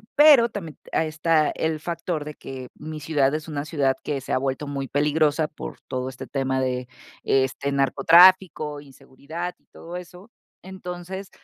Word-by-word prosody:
Pero 290 -6 +7
también 170 -8 -7 0.2
a 160 - +2
está 155 0 +2
el 160 -1 -2
factor 170 -1 -3
de 150 - -6
que 130 -1 -8
mi 155 0 -7
ciudad 145 -3 +1
es 155 0 -5
una 145 -2 -4
ciudad 140 -4 +1
que 145 -2 -2
se - - -4
ha - - +3
vuelto 135 +2 -2
muy 140 -1 -4
peligrosa 150 +2 +2
por 155 - -9
todo 130 0 -3
este 130 - -8
tema 135 -1 -1
de, 125 -1 -2 0.4
este, 135 +1 +1
narcotráfico, 155 +3 +5
inseguridad 145 +5 -8
y - - -38
todo 170 +1 -10
eso. 180 +4 -12 0.3
Entonces, 185 +1 -7
155 Hz, 165 wpm, -24 LUFS, 135-175 Hz, 0.4 s, Pero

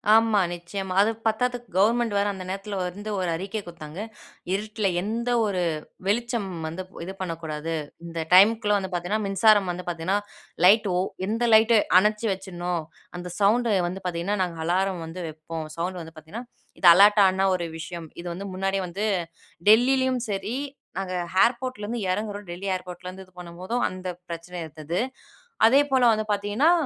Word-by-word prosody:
ஆமா, 225 -2 +4
நிச்சயமா. 185 +2 -5
அது 215 +2 +3 0.2
பத்தாதுக்கு 245 +2 -1
கவர்மெண்ட் 225 +3 +3
வேற 200 0 +2
அந்த 190 -1 -7
நேரத்துல 195 +2 -4
வந்து 200 +4 -5
ஒரு 180 -2 -1
அறிக்கை 195 +5 -4
குடுத்தாங்க 170 -1 -9 0.5
"இருட்ல 210 +1 -1
எந்த 230 +5 -2 0.2
ஒரு 195 -3 -1 0.5
வெளிச்சம் 235 0 0 0.2
வந்து 165 +4 -5 0.2
இது 190 - -6
பண்ணக்கூடாது 165 -2 -4 0.3
இந்த 170 -1 -5
டைம்குள்ள 210 +2 +6
வந்து 190 -1 -3
பார்த்தீங்கன்னா, 180 +5 -1
மின்சாரம் 195 0 +4
வந்து 180 +1 -6
பார்த்தீங்கன்னா 175 +4 0 0.5
லைட் 210 +3 +6
ஒ - - +2 0.3
எந்த 225 +3 -1
லைட் 220 +1 +6 0.2
அணைச்சு 210 +3 +1
வச்சுடணும்." 180 -2 -4 0.4
அந்த 180 0 -6
சவுண்ட் 225 +4 +3 0.2
வந்து 185 +2 -5
பார்த்தீங்கன்னா, 180 +3 -1
நாங்க 175 -2 -4
அலாரம் 185 +1 0
வந்து 165 +3 -8
வைப்போம் 155 0 -6
சவுண்ட் 180 +2 -3
வந்து 165 0 -10
பார்த்தீங்கன்னா, 160 +10 -8 0.4
இது 180 - +4
அலார்டா 205 +3 +7
ஆனா 190 +1 0
ஒரு 175 -2 -2
விஷயம் 165 0 -7
இது 175 - -6
வந்து 190 +3 -6
முன்னாடியே 195 +1 -1
வந்து 190 +4 -4 0.7
டெல்லிலயும் 255 +3 +4
சரி 200 +3 -2 0.4
நாங்க 190 -1 -3 0.3
ஏர்போர்ட்லேருந்து 240 -2 0
இறங்குறோம் 205 +1 -3
டெல்லி 175 +3 -5
ஏர்போர்ட்லேந்து 180 +1 -8
இது 185 - -26
பண்ணும்போதும் 180 +7 -4
அந்த 185 0 -7 0.2
பிரச்சனை 170 +1 -7
இருந்தது. 155 +2 -4 0.7
அதேபோல 270 +1 +4
வந்து 215 0 -1
பார்த்தீங்கன்னா, 205 +10 +2
195 Hz, 150 wpm, -25 LUFS, 175-215 Hz, 0.7 s, அலார்டா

